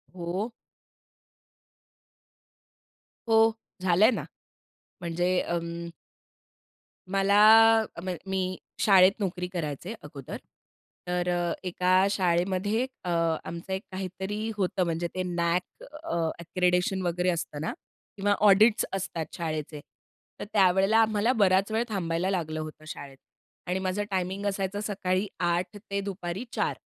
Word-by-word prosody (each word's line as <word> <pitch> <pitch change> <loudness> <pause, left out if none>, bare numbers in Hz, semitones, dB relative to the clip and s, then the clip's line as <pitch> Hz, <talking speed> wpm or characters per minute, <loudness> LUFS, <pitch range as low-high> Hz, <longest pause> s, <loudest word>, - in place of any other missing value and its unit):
हो. 185 +6 -3 2.8
हो. 225 0 +6 0.3
झालंय 185 +5 +5
ना. - - -2 0.8
म्हणजे 175 +1 0
अं 170 0 -3 1.2
मला 195 +1 +3 0.6
अम 180 +3 -5 0.2
मी 190 0 0 0.4
शाळेत 190 -2 +6
नोकरी 180 -3 -2
करायचे 165 +3 -4
अगोदर. 140 -3 -8 0.7
तर 180 0 -1
अ, 175 -1 0
एका 185 +1 +3
शाळेमध्ये 190 +5 +1 0.2
अ, 180 - -4 0.4
आमचं 170 +3 -6
एक 190 - -2
काहीतरी 190 +3 -4
होतं 190 -1 0
म्हणजे 170 0 -1
ते 185 - -1
नॅक 175 0 -2 0.2
अ, 330 - -3 0.2
अक्रेडिशन 180 +2 +1
वगैरे 180 +1 +1
असतं 165 -4 -3
ना 160 - -2 0.4
किंवा 205 +1 +2
ऑडिट्स 210 +3 +5
असतात 175 -4 -3
शाळेचे. 155 -2 -4 0.6
तर - - -4
त्यावेळेला 195 +1 +4
आम्हाला 220 +2 +3
बराचवेळ 195 +4 +2
थांबायला 180 -3 -1
लागलं 160 -5 -2
होतं 155 0 -8
शाळेत 140 -3 -8 0.5
आणि 180 +1 0
माझा 190 +2 -1
टायमिंग 190 +1 -2
असायचा 195 0 -1
सकाळी 195 -2 -1
8:00 175 +2 0
ते 200 -1 -4
दुपारी 195 0 -4
4:00 - - 0
185 Hz, 115 wpm, -27 LUFS, 170-195 Hz, 2.8 s, हो